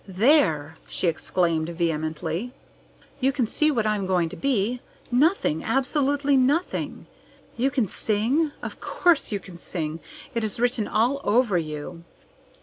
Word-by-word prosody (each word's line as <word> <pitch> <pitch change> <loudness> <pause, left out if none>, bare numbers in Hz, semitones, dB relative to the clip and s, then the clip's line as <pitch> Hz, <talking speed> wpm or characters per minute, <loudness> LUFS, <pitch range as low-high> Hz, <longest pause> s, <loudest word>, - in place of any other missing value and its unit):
"There!" 180 - +2
she - - -3
exclaimed 165 -1 0
vehemently. 165 +6 -2 0.7
"You 270 +1 +3
can 260 -3 0
see 305 +7 +2
what 235 -7 +1
I'm 210 -3 0
going 180 -3 +1
to - - -8
be. 245 -2 0 0.3
Nothing! 260 - +2
Absolutely 275 +3 +1
nothing! 275 +7 0 0.5
You 255 +3 +1
can 255 -5 0
sing? 230 - +1
Of - - -6
course 350 -8 +2
you 205 - -1
can 180 -2 -12
sing! 160 -3 -4 0.3
It 230 -2 -1
is 215 0 -3
written 240 -3 +1
all 245 +6 +1
over 230 -2 +2
you." 155 +2 -6
220 Hz, 140 wpm, -25 LUFS, 170-265 Hz, 0.7 s, You